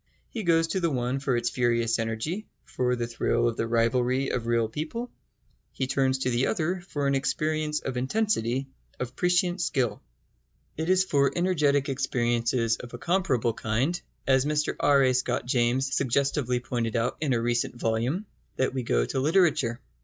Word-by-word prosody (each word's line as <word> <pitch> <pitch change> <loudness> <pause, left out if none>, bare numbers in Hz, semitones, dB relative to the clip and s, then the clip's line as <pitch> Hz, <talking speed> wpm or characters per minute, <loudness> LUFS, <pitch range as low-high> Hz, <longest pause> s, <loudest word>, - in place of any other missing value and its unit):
He 230 - -4
goes 165 -3 +3
to 190 - 0
the 170 -2 +1
one 125 -1 -1
for 135 -3 0
its 120 0 -1
furious 120 -2 +1
energy, 115 - -3 0.2
for 125 0 0
the 120 -1 -2
thrill 120 0 0
of 115 - -1
the 115 - -2
rivalry 125 +3 +1
of 120 -2 -2
real 115 -1 +2
people; 160 - -5 0.6
he 135 - -1
turns 135 0 +1
to 130 -1 -1
the 120 +2 +1
other 175 +3 -1
for 145 -5 -2
an 140 - +2
experience 155 +2 0
of 130 -2 -4
intensity, 130 - 0 0.3
of 125 0 -4
prescient 180 +1 +1
skill. 125 -9 0 0.7
It 160 +2 -3
is 185 0 +4
for 140 -7 +2
energetic 150 -6 +2
experiences 120 -3 0
of 120 -1 -9
a - - -6
comparable 150 -8 +1
kind, 125 +12 -1 0.2
as 130 -1 +4
Mr 150 +1 0
R. 140 -1 +4
A. 130 -1 +3
Scott 125 -1 0
James 125 +2 +1
suggestively 135 -1 +1
pointed 120 -2 -3
out 115 +1 0
in 145 -4 +1
a 120 - +1
recent 120 +1 0
volume, 120 - -1 0.3
that 130 0 0
we 130 - -1
go - - +1
to 130 - -2
literature. 150 -5 +2
130 Hz, 175 wpm, -27 LUFS, 120-150 Hz, 0.7 s, is